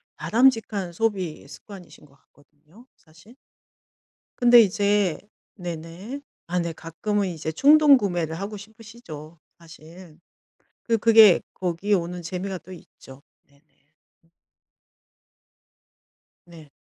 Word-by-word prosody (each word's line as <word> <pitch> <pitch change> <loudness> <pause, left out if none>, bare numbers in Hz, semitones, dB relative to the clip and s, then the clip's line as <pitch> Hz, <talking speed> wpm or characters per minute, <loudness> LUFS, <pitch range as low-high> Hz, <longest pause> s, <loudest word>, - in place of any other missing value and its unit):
바람직한 225 -6 +1
소비 185 -8 -3
습관이신 185 +1 -14
거 140 - -24
같거든요 150 - -24
사실. 170 +9 -21 1.1
근데 240 0 +7
이제 200 -3 +1 0.4
네네. 175 - -8 0.3
아 180 +1 -1
네 170 -1 -3
가끔은 195 +6 -3
이제 160 -3 -5
충동 290 - +6
구매를 175 -7 -3
하고 200 +2 -6
싶으시죠 200 -7 -13 0.2
사실. 165 0 -16 0.6
그 230 -1 0
그게 220 -4 +6
거기에 185 +3 -2
오는 175 -1 -2
재미가 185 +3 -5
또 185 - -16
있죠. 140 -6 -15 0.3
네네. 140 0 -29 2.9
네. 165 -4 -15
180 Hz, 215 characters per minute, -23 LUFS, 165-215 Hz, 2.9 s, 근데